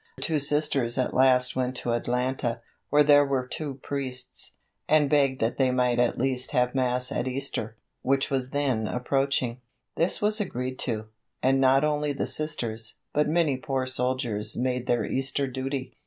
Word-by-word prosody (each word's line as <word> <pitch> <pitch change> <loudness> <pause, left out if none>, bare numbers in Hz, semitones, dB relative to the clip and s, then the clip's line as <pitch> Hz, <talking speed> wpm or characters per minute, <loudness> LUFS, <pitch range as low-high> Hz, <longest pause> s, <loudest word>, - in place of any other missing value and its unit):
Two 155 -2 0
Sisters 145 -4 +1
at 130 - 0
last 130 -1 +4
went 130 0 -1
to 120 - -2
Atlanta, 120 0 -1 0.3
where 150 +1 +5
there 145 0 +6
were 135 -2 -1
two 140 +2 -4
priests, 130 -3 -3 0.3
and 150 -2 +4
begged 140 -3 +3
that 115 +4 0
they 130 -1 +4
might 125 -1 +1
at 120 -1 +2
least 130 +1 -1
have 125 -2 +2
Mass 125 -1 0
at 125 - -1
Easter, 130 -4 -3 0.2
which 135 +1 +1
was 130 -2 -1
then 130 -6 0
approaching. 125 -1 -1 0.4
This 170 - +1
was 210 +1 +2
agreed 130 -8 -4
to, 110 -4 -2 0.4
and 135 +1 +3
not 135 +1 +5
only 150 -1 0
the 140 - -2
Sisters, 115 -8 -3 0.2
but 150 0 +2
many 155 -4 +2
poor 130 0 -2
soldiers 125 -4 -2
made 125 0 -1
their 120 -2 +1
Easter 135 +1 0
duty. 130 0 -4
130 Hz, 165 wpm, -26 LUFS, 125-140 Hz, 0.4 s, there